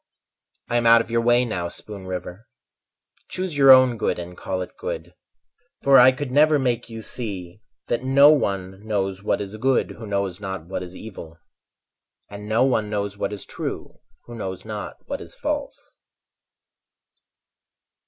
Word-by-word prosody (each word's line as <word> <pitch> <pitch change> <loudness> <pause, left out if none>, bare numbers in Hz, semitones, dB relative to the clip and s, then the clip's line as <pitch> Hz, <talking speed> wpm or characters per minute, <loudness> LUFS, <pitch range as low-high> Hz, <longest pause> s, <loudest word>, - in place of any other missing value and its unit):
I 120 - +1
am 120 -1 +2
out 115 0 +8
of 115 - -8
your 115 0 +2
way 120 +1 +3
now, 90 -7 -3
Spoon 100 +2 -9
River, 90 +4 -6 0.8
Choose 185 -4 -3
your 135 -1 +5
own 130 -3 +7
good - - 0
and 90 0 -7
call 95 0 -3
it - - -12
good. - - -6 0.7
For 140 -1 +7
I 125 +1 +8
could 130 0 -5
never 150 +2 +5
make 125 -3 -1
you 115 -1 -7
see 100 -6 -6 0.2
That 120 +1 -2
no 140 +3 +7
one 100 -8 -1
knows 95 -3 -2
what 105 - 0
is 100 0 -6
good 130 +3 +1
Who 110 - -9
knows 100 -2 -2
not 95 -4 -5
what 90 +1 -4
is 90 0 -8
evil; 85 -7 -10 0.9
And 105 +1 -8
no 115 +3 +3
one 110 -5 +1
knows 100 -1 -2
what 105 - -3
is 105 -2 -7
true - - -6 0.3
Who 120 - -10
knows 95 -5 -6
not 105 -1 -6
what - - -4
is - - -11
false. - - -5
110 Hz, 165 wpm, -23 LUFS, 95-125 Hz, 0.9 s, out